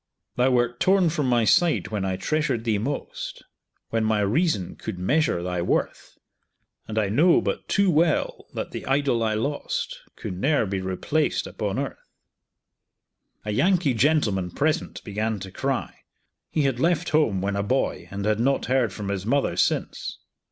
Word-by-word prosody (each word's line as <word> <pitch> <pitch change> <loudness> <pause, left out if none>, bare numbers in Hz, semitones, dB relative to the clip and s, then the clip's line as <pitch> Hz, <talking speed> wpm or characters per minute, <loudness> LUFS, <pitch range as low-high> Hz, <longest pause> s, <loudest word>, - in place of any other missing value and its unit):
Thou 125 +1 +3
wert 120 -1 +1
torn 185 -3 +4
from 150 -4 0
my 120 -2 +3
side 165 -4 +3
when 105 -3 -2
I 95 -1 -1
treasured 140 - 0
thee 110 -3 +1
most, 135 +7 -5 0.5
When 115 -1 +1
my 110 -1 +2
reason 105 - +1
could 110 -5 -6
measure 95 - +1
thy 90 -1 -2
worth, 85 - -2 0.7
And 110 - -5
I 105 -3 +2
know 160 - +5
but - - -3
too 200 -2 +3
well 160 0 +1
that - - -4
the - - -6
idol 135 -3 +2
I 110 -1 +1
lost 140 +7 -2 0.2
Could 90 - -6
ne'er 140 0 +2
be 95 -1 -2
replaced 95 - 0
upon - - -3
earth. - - -5 1.4
A 105 - -2
Yankee 175 - +2
gentleman 110 - +2
present 155 - -1
began 105 +1 -2
to 95 0 -8
cry. - - -2 0.6
He 155 - 0
had 135 -3 0
left 165 +2 +1
home 150 -11 +2
when 100 +2 -1
a 100 - 0
boy, 130 +7 -1
and 100 0 -4
had 105 0 +1
not 135 +3 +1
heard 125 -3 +2
from 100 0 -5
his 100 0 -3
mother 140 +3 +1
since. - - -1
120 Hz, 165 wpm, -25 LUFS, 100-150 Hz, 1.4 s, know